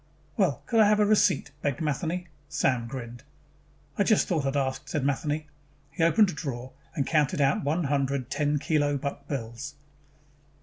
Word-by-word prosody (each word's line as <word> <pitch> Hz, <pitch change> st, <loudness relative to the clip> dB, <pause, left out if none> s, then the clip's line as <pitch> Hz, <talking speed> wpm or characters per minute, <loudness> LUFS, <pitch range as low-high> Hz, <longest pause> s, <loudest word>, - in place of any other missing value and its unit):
"Well -, -, +1 dB
could 230 Hz, -, +2 dB
I 215 Hz, -, +7 dB
have 210 Hz, 0 st, +4 dB
a 210 Hz, -, +5 dB
receipt?" 205 Hz, -8 st, +3 dB
begged 145 Hz, 0 st, -1 dB
Matheny. 165 Hz, +3 st, -2 dB, 0.2 s
Sam 120 Hz, -3 st, +1 dB
grinned. 120 Hz, -1 st, -7 dB, 0.8 s
"I -, -, +5 dB
just 215 Hz, 0 st, +3 dB
thought 155 Hz, -7 st, 0 dB
I'd 135 Hz, +1 st, 0 dB
ask," 130 Hz, -1 st, -2 dB
said 145 Hz, -3 st, -1 dB
Matheny. 150 Hz, +2 st, -1 dB, 0.5 s
He 140 Hz, -, -5 dB
opened 195 Hz, +4 st, +5 dB
a -, -, -8 dB
drawer 130 Hz, -4 st, -5 dB, 0.2 s
and 140 Hz, -, 0 dB
counted 150 Hz, -1 st, +1 dB
out 140 Hz, -1 st, +2 dB
one 155 Hz, +5 st, 0 dB
hundred 140 Hz, -3 st, -1 dB
ten 150 Hz, -1 st, +1 dB
kilo 145 Hz, -1 st, +1 dB
buck 140 Hz, +1 st, -5 dB
bills. 135 Hz, +1 st, -5 dB
145 Hz, 170 wpm, -27 LUFS, 135-160 Hz, 0.8 s, I